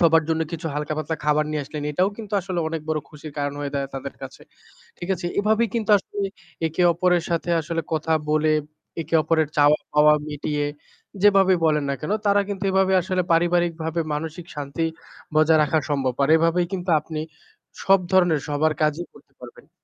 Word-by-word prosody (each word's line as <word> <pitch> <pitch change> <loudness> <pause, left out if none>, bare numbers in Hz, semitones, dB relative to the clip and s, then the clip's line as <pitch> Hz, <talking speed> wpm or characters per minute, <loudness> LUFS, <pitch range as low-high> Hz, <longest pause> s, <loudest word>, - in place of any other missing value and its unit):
সবার 165 -1 +5
জন্য 160 0 0
কিছু 165 0 -4
হালকা 150 +1 -2
পাতলা 155 +1 -3
খাবার 150 0 +2
নিয়ে 150 -1 -2
আসলেন 150 +1 -6
এটাও 185 +6 +2
কিন্তু 215 -3 -9
আসলে 185 -1 -4
অনেক 165 -1 -4
বড় 155 -1 0
খুশির 150 0 -10
কারণ 145 0 -2
হয়ে 145 -1 -4
দাঁড়ায় 140 -1 -2
তাদের 135 - -6
কাছে। - - -9 0.6
ঠিক 175 - -7
আছে 175 0 -5
এভাবেই 220 +2 +2
কিন্তু 220 -2 -1
আসলে 205 +1 -8 0.5
একে 160 +3 -1
অপরের 180 0 +2
সাথে 170 +1 -1
আসলে 165 +1 -3
কথা 160 +1 0 0.2
বলে 155 0 +2 0.5
একে 165 +2 -5
অপরের 160 -1 +1
চাওয়া 145 +1 +5 0.2
পাওয়া 150 0 +6
মিটিয়ে, 150 0 -2 0.6
যেভাবে 195 -2 +5
বলেন 150 -2 +2
না - - 0
কেন 155 +7 -3
তারা 200 0 +4
কিন্তু 200 -1 -4
এভাবে 190 0 +2
আসলে 185 -1 0
পারিবারিকভাবে 170 -1 +1
মানসিক 160 +3 -5
শান্তি 145 +3 -3 0.5
বজায় 155 0 +5
রাখা 150 +2 +1
সম্ভব। 135 -3 0
আর 140 - +2
এভাবেই 165 +2 +2
কিন্তু 180 -1 -2
আপনি 155 -1 -5 0.6
সব 195 0 +5
ধরনের 175 -5 +4
সবার 150 +2 +1
কাজই 155 +3 0
করতে - - -20
পারবেন। - - -13
160 Hz, 180 wpm, -23 LUFS, 150-180 Hz, 0.6 s, পাওয়া